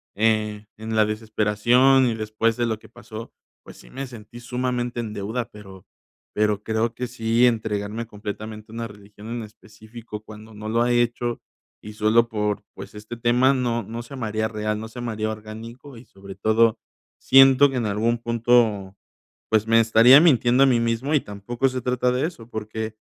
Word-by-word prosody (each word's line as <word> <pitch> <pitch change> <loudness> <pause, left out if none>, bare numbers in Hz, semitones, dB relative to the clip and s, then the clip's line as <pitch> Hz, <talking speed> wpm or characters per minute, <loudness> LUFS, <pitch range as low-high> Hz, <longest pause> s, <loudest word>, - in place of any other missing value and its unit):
eh, 105 -1 0
en 110 +1 -6
la 110 -1 +4
desesperación 110 +5 +2
y 115 - -1
después 110 +1 -1
de 120 - +1
lo 110 -2 -1
que - - -17
pasó, 115 -1 -10 0.3
pues - - -13
sí, - - -16
me 135 +1 -6
sentí 120 -1 -12
sumamente 125 0 -3
en 110 -2 -4
deuda, 115 +4 -4
pero 95 -4 -13 0.5
pero 105 -1 +1
creo 110 +1 -1
que 125 +1 -4
sí, 115 0 +1
entregarme 110 -1 -1
completamente 105 +1 -8
a - - -12
una 115 0 -4
religión 105 0 -14
en 120 0 -4
específico 110 0 -11
cuando 110 +1 -13
no 105 +1 -8
lo 115 +1 +1
ha 120 +1 +2
hecho, 120 0 0 0.4
y 105 - -8
solo 110 +2 +2
por, 105 -2 -2
pues, - - -10
este 110 +3 -8
tema, 120 +3 +3
no 120 -2 -1
no 115 +4 -6
se 130 +4 -10
me 120 -4 -4
haría 110 +1 -1
real, 105 -1 -3
no 110 - -6
se 120 +2 -9
me 120 -1 -3
haría 110 0 -2
orgánico, 115 +5 -10
y 120 - -14
sobre 95 0 -12
todo 110 +1 +2 0.4
siento 135 +1 +6
que - - -5
en 120 - -1
algún 110 +3 0
punto, 115 -4 +1 0.5
pues, 110 -1 +2
me 115 0 +5
estaría 115 +5 +7
mintiendo 130 -5 +4
a - - +5
mí 125 -3 +3
mismo 115 +5 -1
y 145 - +3
tampoco 105 +6 -2
se 130 0 -4
trata 125 0 0
de 130 +5 0
eso, 120 -10 -11
porque 110 0 -5
115 Hz, 190 wpm, -23 LUFS, 110-120 Hz, 0.5 s, estaría